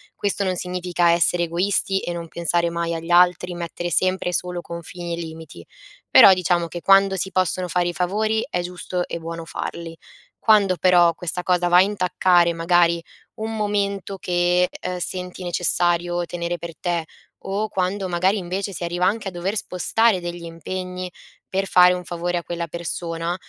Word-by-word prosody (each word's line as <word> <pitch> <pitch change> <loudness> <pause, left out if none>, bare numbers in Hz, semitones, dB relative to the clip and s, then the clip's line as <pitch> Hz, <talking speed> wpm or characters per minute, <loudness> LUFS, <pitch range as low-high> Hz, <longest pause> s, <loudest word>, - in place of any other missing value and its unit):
Questo 200 0 -1
non 185 -1 0
significa 180 -1 0
essere 175 +1 +2
egoisti 190 +3 +1
e 175 - -4
non 170 -1 -6
pensare 170 +1 0
mai 170 0 -2
agli 165 +1 -5
altri, 180 0 +4
mettere 175 0 -5
sempre 185 +1 +1
e 180 - -4
solo 180 -1 -2
confini 170 +1 -7
e - - -11
limiti, 160 - -9 0.5
però 195 - +9
diciamo 175 -1 0
che 175 +1 -7
quando 195 +1 +5
si 190 - -2
possono 185 0 0
fare 175 0 0
i - - -4
favori 215 +5 0
è 180 - -1
giusto 180 0 -4
e 170 - -5
buono 165 0 -6
farli. 165 0 -6 0.4
Quando, 205 -4 +4
però, 175 0 +5
questa 180 +1 -4
cosa 180 -1 +1
va 175 0 +5
a - - +8
intaccare 180 -3 +2
magari 170 0 +3 0.4
un 220 +1 -4
momento 200 -2 -2
che, 180 0 +1
ehm, 180 0 -5
senti 180 +1 -5
necessario 175 0 +1
tenere 175 0 -4
per 170 -1 -8
te 170 -2 -1 0.4
o 205 +2 -2
quando 190 0 -1
magari 185 +4 +1
invece 190 +2 -3
si 175 - -5
arriva 175 +1 -1
anche 210 +1 -1
a - - -3
dover 180 +4 -3
spostare 210 +1 +1
degli 175 0 -6
impegni 180 +2 -6 0.4
per 195 +1 -1
fare 180 -1 +6
un 180 0 -4
favore 175 +1 -2
a 170 - -4
quella 170 0 -4
persona, 170 +1 -4
180 Hz, 175 wpm, -22 LUFS, 170-185 Hz, 0.5 s, però